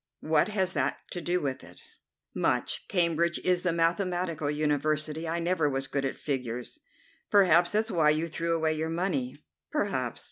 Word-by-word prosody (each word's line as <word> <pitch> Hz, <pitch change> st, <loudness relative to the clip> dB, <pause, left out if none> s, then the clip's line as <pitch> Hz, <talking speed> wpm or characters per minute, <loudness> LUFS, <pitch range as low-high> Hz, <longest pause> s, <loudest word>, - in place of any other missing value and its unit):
"What 155 Hz, -1 st, +3 dB
has 190 Hz, -3 st, -1 dB
that -, -, 0 dB
to 175 Hz, -, -4 dB
do 175 Hz, +2 st, 0 dB
with 135 Hz, -2 st, -3 dB
it?" -, -, -13 dB, 0.5 s
"Much. -, -, 0 dB
Cambridge 170 Hz, -1 st, +1 dB
is 180 Hz, -1 st, +2 dB
the 180 Hz, -, +1 dB
mathematical 170 Hz, -2 st, 0 dB
university. 155 Hz, +1 st, 0 dB
I 165 Hz, -, -1 dB
never 170 Hz, -3 st, +1 dB
was 135 Hz, 0 st, -1 dB
good 135 Hz, 0 st, -2 dB
at 135 Hz, -, -2 dB
figures." 125 Hz, -4 st, -4 dB, 0.5 s
"Perhaps 175 Hz, -3 st, +5 dB
that's 220 Hz, +2 st, +1 dB
why 160 Hz, -4 st, +4 dB
you 155 Hz, +2 st, +1 dB
threw 170 Hz, +1 st, -1 dB
away 160 Hz, -1 st, +1 dB
your 160 Hz, +1 st, -2 dB
money." 165 Hz, -7 st, -1 dB, 0.3 s
"Perhaps. -, -, -1 dB
165 Hz, 165 wpm, -28 LUFS, 150-175 Hz, 0.5 s, Perhaps